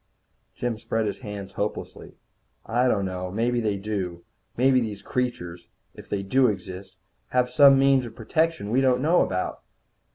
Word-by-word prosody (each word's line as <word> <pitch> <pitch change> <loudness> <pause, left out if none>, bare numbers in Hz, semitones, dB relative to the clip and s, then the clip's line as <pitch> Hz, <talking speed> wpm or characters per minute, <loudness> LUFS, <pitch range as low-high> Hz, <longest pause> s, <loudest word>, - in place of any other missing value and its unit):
Jim 120 -3 -3
spread 115 -1 -1
his 105 - -3
hands 105 -5 -7
hopelessly. 105 +1 -5 0.5
"I 125 +3 +1
don't 100 -5 +1
know. 90 -1 -4
Maybe 120 +5 0
they 105 -3 0
do. 95 -4 -4 0.3
Maybe 130 +1 +4
these 105 -3 -5
creatures 90 -9 -3 0.3
if - - -13
they 100 -1 -2
do 130 +6 +3
exist 95 -3 -5 0.3
have 125 0 +1
some 140 0 +7
means 135 -2 +3
of 115 - -12
protection 155 -1 -1
we 130 +3 +3
don't 130 -1 +2
know 165 +4 +4
about." 90 0 -2
115 Hz, 160 wpm, -25 LUFS, 100-125 Hz, 0.5 s, some